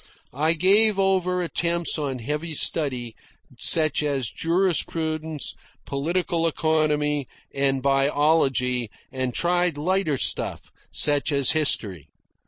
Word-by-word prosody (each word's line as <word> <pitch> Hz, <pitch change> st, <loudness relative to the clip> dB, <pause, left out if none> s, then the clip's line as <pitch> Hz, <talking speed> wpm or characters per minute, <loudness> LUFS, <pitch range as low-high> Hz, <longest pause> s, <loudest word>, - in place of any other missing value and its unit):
I 155 Hz, +5 st, +1 dB
gave 200 Hz, +5 st, +4 dB
over 185 Hz, -2 st, +1 dB
attempts 170 Hz, -1 st, 0 dB
on 140 Hz, -3 st, -3 dB
heavy 150 Hz, +7 st, -4 dB
study, 125 Hz, -8 st, 0 dB, 0.4 s
such 155 Hz, -2 st, +3 dB
as 140 Hz, -6 st, -1 dB
jurisprudence, 160 Hz, -3 st, -1 dB, 0.3 s
political 165 Hz, +3 st, -1 dB
economy, 150 Hz, -3 st, 0 dB, 0.3 s
and 135 Hz, -1 st, 0 dB
biology, 135 Hz, -3 st, +1 dB, 0.2 s
and 130 Hz, -1 st, -3 dB
tried 175 Hz, +1 st, 0 dB
lighter 175 Hz, -1 st, 0 dB
stuff, -, -, -1 dB, 0.2 s
such 145 Hz, +1 st, +1 dB
as 140 Hz, -2 st, +3 dB
history. 105 Hz, -, -1 dB
155 Hz, 100 wpm, -23 LUFS, 140-170 Hz, 0.4 s, gave